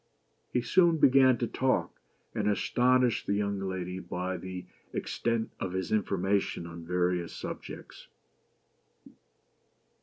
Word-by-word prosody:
He 125 - +1
soon 170 +5 +4
began 130 -3 +6
to 120 - 0
talk, 130 +2 0 0.3
and - - 0
astonished 125 +3 +2
the 100 - +2
young 100 -1 -1
lady 95 -1 -3
by 90 +1 -3
the 90 0 -7 0.3
extent 115 -1 -1
of 90 -2 -3
his 95 -2 -2
information 100 -3 0
on 85 0 -8
various 90 0 0
subjects. - - -8
100 Hz, 115 wpm, -30 LUFS, 90-120 Hz, 0.3 s, began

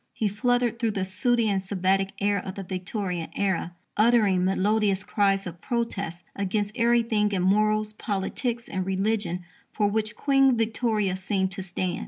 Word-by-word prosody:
He 220 - 0
fluttered 240 +2 +1
through 225 -3 0
the 190 - 0
sooty 235 +4 +1
and 195 -2 +1
Sabbatic 195 0 0
air 205 0 +2
of 190 - -6
the 195 - -5
Victorian 185 -2 -4
era, 185 -3 -1 0.2
uttering 215 -5 +4
melodious 195 +1 +1
cries 195 -1 +1
of 175 -1 -8
protest 200 -8 -3
against 200 +1 -1
everything 230 -3 +2
in 185 -2 0
morals, 215 +2 +2
politics, 230 +4 -3
and 185 - -2
religion 195 -1 -1 0.3
for 210 - +1
which 215 +1 -1
Queen 270 -3 +3
Victoria 220 -4 0
seemed 190 0 -1
to 195 - -5
stand. 185 -1 -3
205 Hz, 155 wpm, -26 LUFS, 190-225 Hz, 0.3 s, uttering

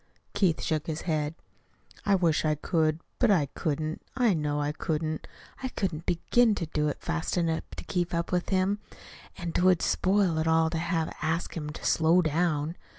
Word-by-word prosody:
Keith 190 -5 +2
shook 155 -1 -1
his 160 -1 -3
head. 155 -2 -1 0.7
"I 200 - +5
wish 170 -5 +2
I 155 -1 +2
could. 155 +1 0 0.2
But 245 - +4
I 175 -8 +4
couldn't, 155 +1 -2 0.2
I 240 -5 +4
know 150 -2 -1
I 145 0 0
couldn't. 155 0 -3 0.3
I 260 - -1
couldn't 180 -9 -3
begin 220 +6 +3
to 175 - -2
do 150 -1 -1
it 145 - -3
fast 170 +1 -2
enough 165 -2 0
to - - -6
keep 175 -2 -1
up 170 0 -2
with 180 -1 0
him, 195 +2 +1 0.6
and 170 -2 -4
't - - +1
would 185 -2 +4
spoil 185 -4 +2
it 160 - 0
all 160 0 +3
to 165 - -1
have 165 -1 -1
to - - -10
ask 165 +2 -1
him 150 -3 -4
to 150 - -8
slow 165 +3 +4
down. 160 0 0
165 Hz, 195 wpm, -28 LUFS, 155-180 Hz, 0.7 s, I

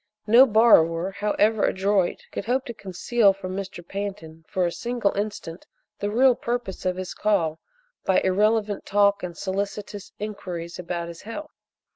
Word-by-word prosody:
No 235 +5 +7
borrower, 190 -6 +4
however 210 +2 +1
adroit, 190 -1 +1
could - - -5
hope 255 +3 0
to 235 - -6
conceal 200 +2 +2
from 185 -1 -6
Mr. 190 -3 -6
Pantin 195 -5 -6
for 185 -1 0
a 170 - 0
single 240 0 -1
instant 200 -4 -5 0.3
the 205 - -1
real 250 +4 +5
purpose 235 -6 -3
of 180 - 0
his 185 -1 -5
call 170 -7 0 0.4
by 190 - +3
irrelevant 210 +2 +1
talk 200 0 +3
and 175 -2 -6
solicitous 200 +1 -4
inquiries 180 -5 -6
about 170 -1 -4
his 170 0 -9
health. 300 +8 -7
200 Hz, 150 wpm, -24 LUFS, 180-215 Hz, 0.4 s, No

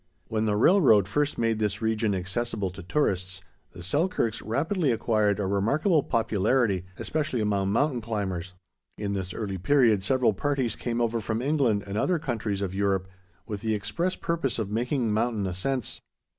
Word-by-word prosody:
When 110 -1 0
the 105 -1 +1
railroad 115 - +5
first 145 +7 0
made 115 -1 +1
this 105 -1 -1
region 110 -2 0
accessible 95 +2 -2
to 95 +2 -9
tourists, 95 - -1 0.3
the 90 - -9
Selkirks 115 - 0
rapidly 145 - 0
acquired 110 -3 +1
a 100 - 0
remarkable 140 - +2
popularity, 110 -4 +1
especially 155 -5 -2
among 100 -2 +1
mountain 130 +2 +1
climbers. 95 -5 -3 0.4
In 100 -1 -2
this 95 -2 -3
early 95 -1 -4
period 115 -2 +4
several 125 +1 +2
parties 130 +1 -1
came 120 -1 -3
over 115 -1 0
from 110 +1 -2
England 130 -7 +1
and 100 +1 -3
other 180 +6 +2
countries 110 -9 -2
of 95 -1 -3
Europe 95 -1 0 0.4
with 105 -2 -5
the 110 -1 0
express 105 - -2
purpose 165 -8 -1
of 105 -3 -3
making 120 +1 0
mountain 110 -2 0
ascents. 100 +7 -3
110 Hz, 160 wpm, -27 LUFS, 100-130 Hz, 0.4 s, railroad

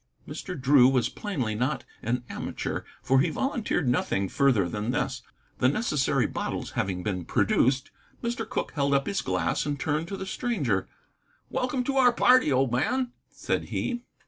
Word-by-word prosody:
Mr. 180 -6 -6
Drew 130 -1 +6
was 130 -3 +2
plainly 140 - -3
not 125 +5 -1 0.2
an 120 +2 -1
amateur, - - -4 0.2
for 135 0 +4
he 160 +5 +3
volunteered 220 - -1
nothing 100 -5 +1
further 130 -10 +3
than 105 +5 -3
this. 125 - -1 0.4
The 125 - +4
necessary 150 - +1
bottles - - -3
having 90 -1 -2
been 90 -4 -2
produced, 130 - +2 0.3
Mr. 235 -2 -2
Cooke - - -2
held 140 -2 +1
up 135 0 +2
his 200 - -1
glass 90 -3 0
and 145 -1 -3
turned 150 +4 -1
to 195 +1 -5
the 190 - -5
stranger. 155 - -1 0.6
"Welcome 255 0 0
to 275 +2 -1
our 250 -2 +6
party, 250 - +5
old 130 -1 +2
man," 245 - 0 0.2
said - - -2
he. 240 -1 -2
140 Hz, 165 wpm, -27 LUFS, 125-210 Hz, 0.6 s, Drew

